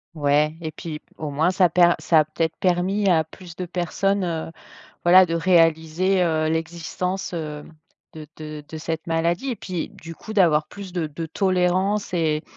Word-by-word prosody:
Ouais 150 +1 +2
et 160 -1 -4
puis 155 0 -7 0.2
au 155 - -4
moins 155 +5 +1
ça 185 -1 +3
per 175 +1 +5
ça 165 - +4
a 155 - +3
peut-être 160 +1 -2
permis 185 +3 +1
à 165 -3 +4
plus 170 +2 -13
de 180 - -4
personnes, 185 +3 -1
heu, 165 -2 -3 0.5
voilà 185 +2 +7
de 165 - -3
réaliser, 165 +2 +2
heu, 160 -2 +1
l'existence, 170 +4 -3
heu, 150 -3 -5 0.5
de 155 -1 -9
de 155 -1 -8
de 160 - -7
cette 160 +1 -4
maladie 170 +9 0
et - - -3
puis 185 -5 -5
du 165 +1 -11
coup 215 +6 -9
d'avoir 160 -7 +3
plus 200 +2 -9
de 170 -3 -1
de 155 +2 -6
tolérance 185 +3 0
et 155 -3 0
165 Hz, 175 wpm, -23 LUFS, 155-185 Hz, 0.5 s, voilà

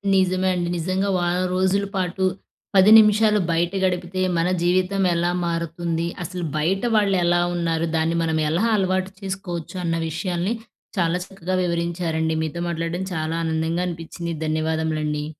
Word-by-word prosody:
నిజమే 185 0 +2
అండి. 175 -1 -1
నిజంగా 185 +4 -1
వారం 175 +1 0
రోజులు 190 +2 +1
పాటు, 185 0 -1 0.5
10 195 +2 +7
నిమిషాలు 210 0 +4
బయట 170 +1 +1
గడిపితే 180 0 -1 0.2
మన 165 - +2 0.2
జీవితం 185 +2 +2
ఎలా 175 +1 +1 0.2
మారుతుంది, 170 0 -2 0.2
అసలు 180 +1 -5
బయట 180 +6 +1
వాళ్ళెలా 180 -4 +3
ఉన్నారు, 165 -1 0
దాన్ని 160 +1 +1
మనం 160 -1 0
ఎలా 175 +8 +1
అలవాటు 185 -1 0
చేసుకోవచ్చు 190 -3 -5
అన్న 165 0 0
విషయాలని 175 +4 -2 0.4
చాలా 170 -1 +2
చక్కగా 185 -1 -4
వివరించారండి. 170 -2 -1
మీతో 160 +2 -4
మాట్లాడడం 170 +2 -2
చాలా 160 +1 -2
ఆనందంగా 160 +2 0
అనిపిచ్చింది. 170 0 -5
ధన్యవాదములండి. 155 -1 -1
175 Hz, 135 wpm, -23 LUFS, 165-185 Hz, 0.5 s, 10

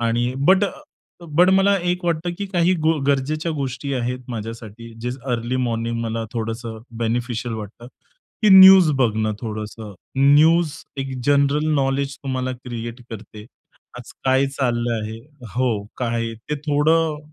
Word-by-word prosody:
आणि 120 +2 0
but 190 +2 +5
a, - - -2 0.5
but 170 +2 +3
मला 195 +1 +4
एक 180 0 -3
वाटतं 170 0 -1
की 200 - -3
काही 180 -1 +2
गो 160 0 +1
गरजेच्या 150 +4 0
गोष्टी 140 -1 -4
आहेत 125 0 -2
माझ्यासाठी, 115 0 -7
जे 120 +1 -3 0.2
अर्ली 120 +2 -2
मॉर्निंग 115 -2 -2
मला 115 0 -3
थोडंसं 115 -1 -4 0.2
बेनिफिशियल 120 0 -2
वाटतं, 110 +2 -9 0.6
की 215 - +5
न्यूज 190 -3 +9
बघणं 110 -3 +1
थोडंसं. 110 -1 -6 0.2
न्यूज 155 +4 +5 0.3
एक 135 0 -4
जनरल 145 +1 +2
नॉलेज 135 0 0
तुम्हाला 130 -1 -2
क्रिएट 120 -1 -7
करते. 105 -1 -10 0.5
आज 125 - -11
काय 130 +1 +3
चाललं 120 -3 -1
आहे? 110 +1 -6 0.4
हो 120 -5 0
काय 115 -2 -2 0.2
ते - - +1
थोडं, 155 +1 +2
130 Hz, 140 wpm, -21 LUFS, 115-150 Hz, 0.6 s, न्यूज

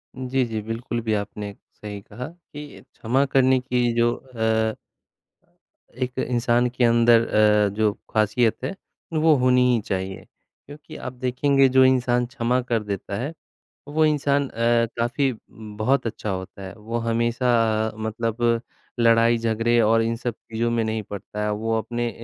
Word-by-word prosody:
जी, 130 0 -1
जी। 110 -2 -4
बिल्कुल 115 +2 -4
भी 110 -1 -1
आपने 105 0 -4 0.2
सही 105 -1 -8
कहा 125 +5 -8
कि 150 -3 -12
क्षमा 130 +5 +1
करने 130 -1 +3
की 125 -1 0
जो 120 0 +3
अ 110 -3 -1 1.2
एक 125 0 -3
इंसान 120 -1 +1
के 125 +1 -2
अंदर 115 0 +4
अ, 105 -1 +4
जो 105 -1 +2 0.2
ख़ासियत 110 +2 +2
है, 195 - -3 0.4
वो 155 0 +4
होनी 125 -1 +3
ही 120 - +2
चाहिए 95 -1 -4 0.4
क्योंकि 145 +1 -12
आप 130 - -6
देखेंगे 135 +2 +2
जो 130 - +7
इंसान 125 -1 +2
क्षमा 125 0 -1
कर 120 -3 -1
देता 100 -1 -5
है, 140 +8 -4 0.6
वो 155 +2 +2
इंसान 145 -2 +1
अ, 115 0 +2
काफ़ी 130 +3 +1 0.2
बहुत 110 +4 -2
अच्छा 110 -1 -4
होता 95 +1 -6
है, 95 - -7
वो 115 +1 -4
हमेशा 115 -1 +1
मतलब 115 +1 -1 0.4
लड़ाई-झगड़े 115 0 +3
और 115 +1 +3
इन 115 0 -1
सब 120 -1 -4
चीज़ों 115 +1 -3
में 115 -1 +1
नहीं 110 0 -2
पड़ता 105 +1 -7
है, 105 - 0
वो 115 +2 -1
अपने 120 +2 -3
115 Hz, 150 wpm, -23 LUFS, 110-125 Hz, 1.2 s, जो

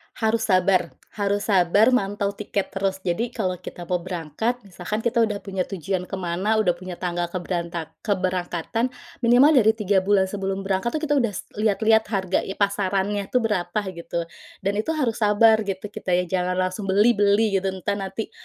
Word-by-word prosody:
Harus 220 0 +1
sabar 185 -1 +3 0.2
harus 205 0 -1
sabar 200 +5 +4
mantau 200 -4 0
tiket 200 -1 -3
terus. 195 -1 -2
Jadi 225 +7 -2
kalau 185 -5 -2
kita 175 -1 -8
mau 180 +1 -1
berangkat, 180 +6 -2
misalkan 200 +3 -5
kita 235 0 +1
udah 210 -3 +1
punya 190 -2 -3
tujuan 185 0 -3
ke - - -4
mana, 185 +4 -1
udah 215 -5 +3
punya 180 +1 -7
tanggal 175 -1 -2
keberantak 170 -2 -4
keberangkatan, 185 +2 -1 0.3
minimal 245 +5 +6
dari 220 -7 +5
3 205 -3 +2
bulan 195 0 +3
sebelum 195 0 -3
berangkat 195 +7 -1
tuh, 310 - -2
kita 290 -2 +2
udah 210 -7 -1 0.2
lihat-lihat 220 +1 +3
harga 190 -3 0 0.2
pasarannya 200 0 0
tuh 250 -2 +1
berapa, 190 -2 0
gitu. 170 -1 -4 0.4
Dan 200 +2 0
itu 320 +8 -1
harus 240 -7 -1
sabar, 220 +1 +5
gitu. 190 0 -3
Kita 180 -3 -1
nya 180 - +2
jangan 180 0 -1
langsung 185 +2 -2
beli 205 +5 +5
beli, 205 -1 +3
gitu. 195 - -3
Entah, 200 +2 -2
nanti 200 +3 -5
195 Hz, 170 wpm, -23 LUFS, 185-220 Hz, 0.4 s, minimal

